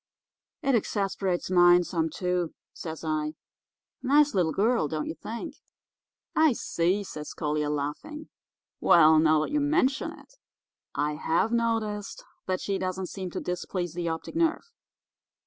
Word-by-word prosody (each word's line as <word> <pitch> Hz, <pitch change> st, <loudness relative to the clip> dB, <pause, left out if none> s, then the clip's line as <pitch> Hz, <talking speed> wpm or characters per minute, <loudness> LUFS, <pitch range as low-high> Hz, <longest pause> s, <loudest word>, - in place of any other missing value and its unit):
"'It 275 Hz, -2 st, +2 dB
exasperates 195 Hz, -5 st, -1 dB
mine 175 Hz, 0 st, +6 dB
some, 165 Hz, -2 st, -1 dB
too,' 180 Hz, 0 st, -2 dB, 0.2 s
says 160 Hz, -1 st, -7 dB
I. 155 Hz, -1 st, -1 dB, 0.7 s
'Nice 290 Hz, +3 st, +4 dB
little 175 Hz, -4 st, +2 dB
girl, 215 Hz, -2 st, +2 dB
don't 155 Hz, 0 st, -3 dB
you -, -, -4 dB
think?' 225 Hz, +7 st, -7 dB, 0.8 s
"'I 315 Hz, -4 st, +5 dB
see,' 185 Hz, -1 st, 0 dB
says 150 Hz, -5 st, -7 dB
Collier, 150 Hz, -1 st, -1 dB
laughing. 150 Hz, -, -4 dB, 0.5 s
'Well, 160 Hz, -2 st, +6 dB
now 155 Hz, -1 st, +4 dB
that 155 Hz, -, -3 dB
you 295 Hz, -, +2 dB
mention 290 Hz, -2 st, +1 dB
it, -, -, -16 dB, 0.6 s
I 150 Hz, +1 st, -1 dB
have 180 Hz, +9 st, +1 dB
noticed 225 Hz, -3 st, -1 dB, 0.2 s
that 185 Hz, -1 st, -1 dB
she 195 Hz, -1 st, -1 dB
doesn't 185 Hz, 0 st, -3 dB
seem 190 Hz, -2 st, -5 dB
to -, -, -4 dB
displease 180 Hz, -1 st, -3 dB
the 170 Hz, -1 st, -2 dB
optic 160 Hz, -, -5 dB
nerve. 335 Hz, +7 st, 0 dB
180 Hz, 140 wpm, -27 LUFS, 160-230 Hz, 0.8 s, mine